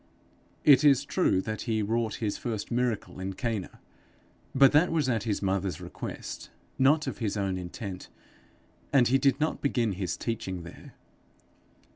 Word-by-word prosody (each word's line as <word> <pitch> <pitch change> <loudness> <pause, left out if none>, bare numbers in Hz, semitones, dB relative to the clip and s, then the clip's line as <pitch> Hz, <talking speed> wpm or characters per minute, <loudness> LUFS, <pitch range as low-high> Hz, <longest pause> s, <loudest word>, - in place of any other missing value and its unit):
It 140 -2 +7
is 140 -2 +5
true 145 - +2
that 110 +4 -5
he 110 -1 +1
wrought 110 0 -1
his 105 -3 -2
first 110 -2 -4
miracle 120 -5 -1
in 95 +1 -4
Cana, 110 -2 -4 0.8
but 135 0 +7
that 155 +4 +4
was 155 -5 +1
at 115 -3 0
his 105 -2 -1
mother's 95 -1 -1
request, - - -7 0.3
not 150 +4 +4
of 135 - -5
his 110 -3 -2
own 95 -2 -1
intent, 90 +1 -6 0.8
and 130 -4 +5
he 135 +2 +4
did 135 0 +2
not 155 +1 -1
begin 120 -6 +1
his 90 -3 -3
teaching 95 -6 -4
there. 85 - -12
115 Hz, 155 wpm, -28 LUFS, 100-135 Hz, 0.8 s, It